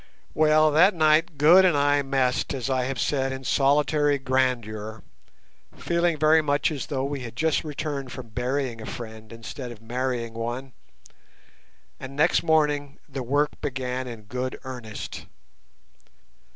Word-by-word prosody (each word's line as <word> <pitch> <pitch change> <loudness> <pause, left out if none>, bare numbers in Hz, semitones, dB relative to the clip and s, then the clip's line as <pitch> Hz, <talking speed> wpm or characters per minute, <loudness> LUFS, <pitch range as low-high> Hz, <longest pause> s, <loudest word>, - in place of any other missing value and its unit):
Well, 155 0 +4
that 180 +6 +5
night 155 -1 +3
Good 165 +6 +7
and 175 -5 +4
I 145 0 +3
messed 135 -1 0
as 135 0 -3
I 130 -1 +1
have 130 -1 -3
said 135 -2 0
in 130 0 -6
solitary 145 +2 +2
grandeur, 120 -5 -1 0.7
feeling 170 -1 0
very 155 +1 +5
much 145 +1 +1
as 145 -3 -4
though 135 -3 -2
we 140 0 -3
had 120 -3 -8
just 160 +3 +1
returned 145 -3 -4
from 130 -4 -8
burying 125 +1 -2
a - - -8
friend 110 -2 -8
instead 115 +2 -7
of 115 - -11
marrying 120 0 -3
one, 120 +3 -5 1.3
and 135 +1 -8
next 160 +4 +3
morning 150 -3 +1
the 135 - -5
work 145 +4 0
began 130 -1 -3
in 115 -3 -8
good 125 +4 -4
earnest. 120 -5 -7
135 Hz, 145 wpm, -25 LUFS, 125-150 Hz, 1.3 s, Good